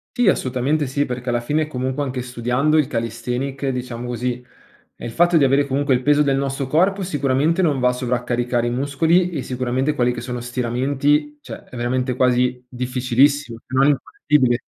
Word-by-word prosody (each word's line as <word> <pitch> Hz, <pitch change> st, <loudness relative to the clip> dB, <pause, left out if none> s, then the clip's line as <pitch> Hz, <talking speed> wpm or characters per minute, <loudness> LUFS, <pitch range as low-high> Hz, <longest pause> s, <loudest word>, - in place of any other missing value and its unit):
Sì, 245 Hz, -3 st, +2 dB
assolutamente 135 Hz, +2 st, 0 dB
sì, 140 Hz, +2 st, 0 dB
perché 125 Hz, 0 st, -5 dB
alla 120 Hz, 0 st, 0 dB
fine 150 Hz, +5 st, 0 dB
comunque 130 Hz, 0 st, -3 dB
anche 130 Hz, -3 st, -3 dB
studiando 125 Hz, +5 st, 0 dB
il 140 Hz, -, +2 dB
calisthenics, 125 Hz, +3 st, -3 dB
diciamo 125 Hz, -2 st, -4 dB
così, 125 Hz, +1 st, -3 dB, 0.5 s
è -, -, -9 dB
il 115 Hz, -, -5 dB
fatto 175 Hz, +4 st, +3 dB
di 145 Hz, -, +4 dB
avere 140 Hz, +1 st, +3 dB
comunque 140 Hz, 0 st, +1 dB
il 125 Hz, -, +1 dB
peso 145 Hz, +2 st, +3 dB
del 135 Hz, -1 st, +1 dB
nostro 135 Hz, 0 st, -2 dB
corpo 185 Hz, +8 st, +1 dB
sicuramente 145 Hz, +1 st, +1 dB
non 150 Hz, -6 st, +1 dB
va 125 Hz, -, +3 dB
a -, -, +2 dB
sovraccaricare 120 Hz, -1 st, -1 dB
i 120 Hz, -, -1 dB
muscoli 160 Hz, +8 st, +2 dB
e 150 Hz, -7 st, -4 dB
sicuramente 130 Hz, +3 st, -1 dB
quelli 125 Hz, -3 st, +1 dB
che 120 Hz, -, -5 dB
sono 125 Hz, -1 st, -5 dB
stiramenti, 135 Hz, +5 st, 0 dB
cioè, -, -, -10 dB
è -, -, -13 dB
veramente 125 Hz, +1 st, -1 dB
quasi 125 Hz, 0 st, +1 dB
difficilissimo, 125 Hz, +1 st, +1 dB
se 130 Hz, -, -8 dB
non 135 Hz, +1 st, +4 dB
infattibile. 135 Hz, -2 st, +1 dB
130 Hz, 185 wpm, -21 LUFS, 125-145 Hz, 0.5 s, di